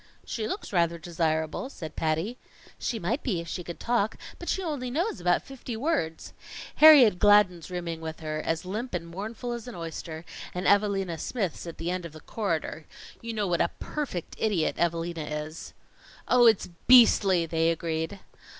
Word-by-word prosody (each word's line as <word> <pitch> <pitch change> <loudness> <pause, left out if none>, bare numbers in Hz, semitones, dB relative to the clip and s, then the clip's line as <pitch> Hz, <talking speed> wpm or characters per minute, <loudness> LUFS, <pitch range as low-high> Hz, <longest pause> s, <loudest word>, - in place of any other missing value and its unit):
"She 220 -2 -3
looks 385 - -5
rather 170 -2 +2
desirable," 160 - -1
said 160 - -8
Patty. 165 +10 -1 0.4
"She 235 - -2
might 220 - -1
be 200 -10 -1
if 170 - -7
she 180 +2 -4
could 170 0 -8
talk, 230 -3 0 0.2
but 345 - -6
she 385 - 0
only 290 -7 -3
knows 320 - -1
about 175 0 +2
fifty 255 -3 -7
words. 230 - -2 0.4
Harriet 275 -11 +8
Gladden's 205 -5 +4
rooming 170 -2 -4
with 160 0 -6
her, 155 -1 -3
as 165 +1 -2
limp 215 +4 -4
and 170 -1 -3
mournful 215 +7 -5
as 235 0 -5
an 245 - -7
oyster, 165 -1 -6 0.3
and 180 - -3
Evalina 195 -4 +2
Smith's 190 -4 -3
at 170 - -7
the 170 +2 -2
end 180 0 -3
of 170 -3 -8
the 155 - -10
corridor. 165 -4 -3 0.3
You 230 0 -5
know 210 -1 0
what 175 -2 +1
a 170 - +2
perfect 275 - -4
idiot 200 -8 +1
Evalina 170 -1 -1 0.2
is." 155 +2 -10 0.5
"Oh, 245 -1 +6
it's 220 -5 +3 0.2
beastly!" 200 -8 +6
they 165 0 +1
agreed. 165 +3 -2
180 Hz, 175 wpm, -27 LUFS, 165-230 Hz, 0.5 s, Harriet